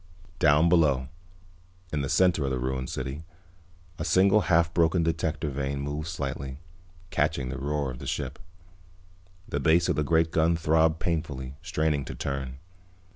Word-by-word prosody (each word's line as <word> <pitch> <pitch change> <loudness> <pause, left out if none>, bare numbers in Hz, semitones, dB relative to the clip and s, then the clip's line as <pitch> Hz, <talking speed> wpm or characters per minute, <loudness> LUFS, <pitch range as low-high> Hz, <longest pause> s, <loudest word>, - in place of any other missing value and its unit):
Down 75 0 +5
below, 75 -7 +3 0.8
in 75 - 0
the 70 - -3
center 90 -4 +3
of 70 - 0
the 65 - -1
ruined 65 +1 -2
city, 65 +4 -5 0.8
a - - -2
single 100 +3 +4
half 85 -1 +2
broken 85 +1 +3
detector 80 -1 -1
vane 70 0 -2
moved 75 +2 -4
slightly, 70 -3 -4 0.5
catching 75 -4 0
the 65 - -4
roar 70 -1 -1
of - - -9
the - - -7
ship. - - -3 1.1
The 70 - -2
base 80 +4 +3
of - - +2
the 75 - +1
great 80 +2 +2
gun 80 +1 +2
throbbed 80 0 +2
painfully, 75 -6 -3
straining 80 -4 0
to - - -7
turn. 65 -2 -4
75 Hz, 155 wpm, -27 LUFS, 70-80 Hz, 1.1 s, Down